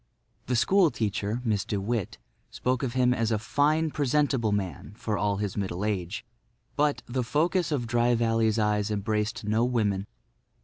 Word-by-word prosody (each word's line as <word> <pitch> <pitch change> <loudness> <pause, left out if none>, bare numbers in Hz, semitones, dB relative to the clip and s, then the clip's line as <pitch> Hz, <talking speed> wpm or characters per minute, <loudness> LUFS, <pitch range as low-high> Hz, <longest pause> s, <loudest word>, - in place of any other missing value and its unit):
The 125 - +1
school 185 - +4
teacher, 105 0 -2
Miss 105 -4 +1
De 100 +1 -2
Witt, 105 -1 -2 0.3
spoke 125 0 -1
of 125 -3 -2
him 125 -1 +4
as 115 -2 0
"a 110 - +2
fine, 150 +8 +1
presentable 140 -5 +1
man, 95 -3 -3
for 110 - -2
all 100 0 0
his 100 -1 -3
middle 95 -1 -2
age." 95 -2 -3 0.5
But, 145 0 +1
the 125 +1 -2
focus 165 +7 +1
of 135 -5 0
Dry 120 +1 +2
Valley's 115 -1 +2
eyes 105 -1 +1
embraced 105 +2 -1
no 110 +2 +1
women. 105 -5 0
115 Hz, 165 wpm, -27 LUFS, 105-125 Hz, 0.5 s, school